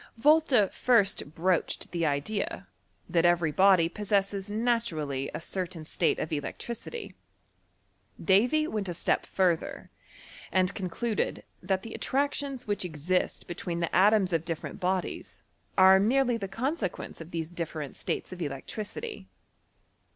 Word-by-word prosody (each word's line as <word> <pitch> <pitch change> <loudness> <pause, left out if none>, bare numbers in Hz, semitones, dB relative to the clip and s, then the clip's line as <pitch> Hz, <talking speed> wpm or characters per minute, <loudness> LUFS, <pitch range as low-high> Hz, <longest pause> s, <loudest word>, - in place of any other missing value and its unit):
Votta 275 -6 +4
first 200 - +2
broached 180 +1 0
the 170 -2 0
idea, 150 +9 -2 0.4
that 170 -2 +2
every 175 -2 +3
body 185 0 +5
possrases 200 +1 -1
naturally 205 - -1
a - - -3
certain 175 -2 -4
state - - +1
of 155 - -3
electricity, 235 - -5 1.1
Davy 245 +11 +3
went 210 - -3
s 170 - -4
step - - 0
further, 180 -4 0 0.6
and 185 0 +2
concluded, 205 +4 -2 0.2
that 190 -1 -1
the 225 - -7
attractioBS 280 -1 -1
which 205 -2 -1
exist 180 +2 -1
between 175 0 -4
the 170 - -1
atoms 195 0 +4
of 165 -1 +1
different 165 +3 -5
bodies 185 -1 -2 0.3
are 190 0 +8
merely 245 +4 +3
the 200 -4 -3
consequence 230 - -3
of 165 - -9
these 165 -1 -4
different 160 -4 -5
states - - -3
of 180 - -9
electricity. 145 - -5
190 Hz, 130 wpm, -29 LUFS, 170-220 Hz, 1.1 s, are